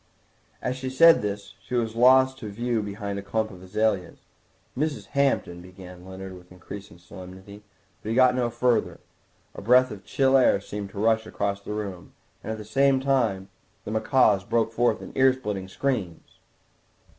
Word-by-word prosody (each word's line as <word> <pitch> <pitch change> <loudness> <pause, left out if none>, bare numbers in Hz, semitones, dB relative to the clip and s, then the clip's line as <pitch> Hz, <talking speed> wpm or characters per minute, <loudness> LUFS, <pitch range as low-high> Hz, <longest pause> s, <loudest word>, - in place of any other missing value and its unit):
As 125 - -1
she 130 0 -4
said 165 +5 +6
this 100 -1 -5
she 125 - -6
was 115 -2 -1
lost 130 +2 +5
to 105 - -6
view 115 +2 -2
behind 100 -1 -5
a - - -6
clump 110 +2 -2
of 90 -2 -12
azaleas. 100 -1 -1 0.6
"Mrs. 150 +2 -2
Hampton—" 135 -11 0
began 90 0 -13
Leonard 95 0 -8
with 90 0 -16
increased 95 +2 -10 0.2
solemnity, 95 +2 -11 0.4
but 110 - -6
he 115 - -1
got 130 0 +5
no 125 -1 0
further. 120 0 0 0.5
A - - -9
breath 125 +4 +4
of 100 -2 -9
chill 135 -1 +2
air 130 -6 +4
seemed 100 0 -7
to 100 - -9
rush 110 0 +2
across 100 -2 -3
the 105 - -6
room, 100 -4 -6 0.3
and - - -4
at 110 - -4
the 105 - -9
same 135 +4 +3
time 120 -8 0 0.4
the - - -5
macaws 110 -3 +3
broke 115 +2 0
forth 120 +1 +1
into - - -7
ear 130 0 +6
splitting 105 -7 -5
screams. 100 -6 -4
110 Hz, 175 wpm, -25 LUFS, 100-125 Hz, 0.6 s, said